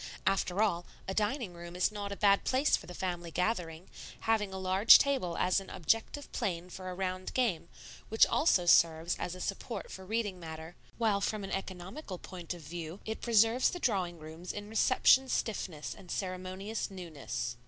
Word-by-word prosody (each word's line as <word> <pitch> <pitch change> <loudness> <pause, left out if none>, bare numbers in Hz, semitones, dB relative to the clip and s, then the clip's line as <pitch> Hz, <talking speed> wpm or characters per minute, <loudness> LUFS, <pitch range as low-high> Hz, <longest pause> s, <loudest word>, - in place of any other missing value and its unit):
After 195 +1 +2
all, 175 -5 0 0.2
a 190 - -2
dining 215 0 -1
room 170 0 -9
is 180 +3 +2
not 205 -1 -5
a - - -3
bad 200 -1 +4
place 265 +3 +3
for - - -8
the 180 - -8
family 175 -2 -3
gathering, 175 -1 -2 0.3
having 215 -3 +1
a 190 - -5
large 190 +3 +7
table 260 -12 0
as 185 +2 +2
an 195 - -10
objective 225 - -1
plane 180 -1 -3
for 185 0 -7
a 180 - -5
round 185 0 -3
game, 210 -10 0 0.4
which 220 - +6
also 190 - +3
serves 165 0 +4
as 180 - -3
a - - -10
support 195 +5 -4
for 190 - -8
reading 205 -2 -2
matter; 160 0 -8 0.2
while 215 -4 +2
from 210 0 -1
an 195 - -6
economical 190 - -5
point 175 -1 -7
of 170 - -12
view 165 +3 -6
it 220 0 -4
preserves 230 +2 +4
the 355 - -5
drawing 185 - 0
rooms 160 +3 -8
in 205 0 -7
reception 255 +3 +4
stiffness 185 -11 -2
and 180 - -15
ceremonious 185 +4 -4
newness. 160 -9 -5
190 Hz, 180 wpm, -32 LUFS, 175-215 Hz, 0.4 s, large